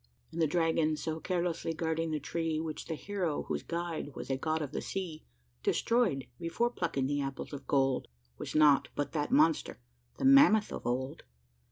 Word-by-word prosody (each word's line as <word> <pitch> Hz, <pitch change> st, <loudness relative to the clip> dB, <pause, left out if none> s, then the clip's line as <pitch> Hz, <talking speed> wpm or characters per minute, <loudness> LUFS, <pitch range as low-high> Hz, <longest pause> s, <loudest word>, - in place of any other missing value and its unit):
And 165 Hz, +1 st, -3 dB
the 160 Hz, -, +4 dB
dragon 160 Hz, -1 st, +1 dB
so 160 Hz, 0 st, -3 dB
carelessly 170 Hz, -2 st, -1 dB
guarding 165 Hz, 0 st, -1 dB
the 155 Hz, -1 st, -1 dB
tree, 160 Hz, +2 st, -2 dB
Which 160 Hz, -1 st, -4 dB
the 160 Hz, -, -3 dB
hero, 180 Hz, -3 st, -2 dB
whose -, -, -3 dB
guide 170 Hz, -4 st, -4 dB
was -, -, -5 dB
a -, -, +2 dB
god 155 Hz, +3 st, -1 dB
of 145 Hz, -, -5 dB
the -, -, -3 dB
sea, 175 Hz, -5 st, -4 dB, 0.4 s
Destroyed 220 Hz, -, +1 dB
before 230 Hz, +9 st, 0 dB
plucking 165 Hz, -, -1 dB
the 145 Hz, +1 st, 0 dB
apples 135 Hz, +1 st, -5 dB
of 140 Hz, -, -7 dB
gold 135 Hz, -2 st, +2 dB, 0.3 s
Was -, -, -6 dB
nought 150 Hz, -2 st, +5 dB
but 145 Hz, -, -2 dB
that 150 Hz, -2 st, -1 dB
monster 155 Hz, +1 st, +3 dB, 0.4 s
the -, -, -2 dB
mammoth 270 Hz, -6 st, +6 dB
of -, -, -5 dB
old. 130 Hz, +5 st, -2 dB
160 Hz, 180 wpm, -31 LUFS, 145-170 Hz, 0.4 s, mammoth